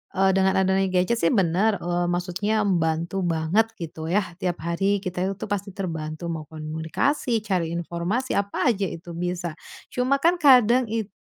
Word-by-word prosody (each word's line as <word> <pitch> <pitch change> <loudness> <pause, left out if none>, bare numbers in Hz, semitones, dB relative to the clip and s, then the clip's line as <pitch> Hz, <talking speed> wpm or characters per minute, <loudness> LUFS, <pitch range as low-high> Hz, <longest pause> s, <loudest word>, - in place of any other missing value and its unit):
eee, 195 0 +4
dengan 190 0 +2
adanya 190 0 +2
gadget 185 +5 +1
sih 165 - +2
bener, 195 +3 +2
eee, 175 0 0
maksudnya 180 +5 0
membantu 170 -1 0
banget, 165 +7 +2
gitu 160 -3 -7
ya, 200 +5 +2 0.2
tiap 175 -4 -2
hari 195 +4 0
kita 185 -2 -4 0.2
itu - - -6
pasti 200 -1 -3
terbantu 165 -3 -4
mau 155 -2 -5
komunikasi, 160 - -1
cari 175 -5 -1
informasi 175 +9 -2
apa 200 +4 +1
aja 200 -3 -1
itu 170 0 -8
bisa. 175 0 -3 0.4
Cuma 255 +2 +1
kan 345 +2 +4
kadang 250 -4 +6
itu, 220 -1 -3
185 Hz, 160 wpm, -24 LUFS, 170-210 Hz, 0.4 s, kadang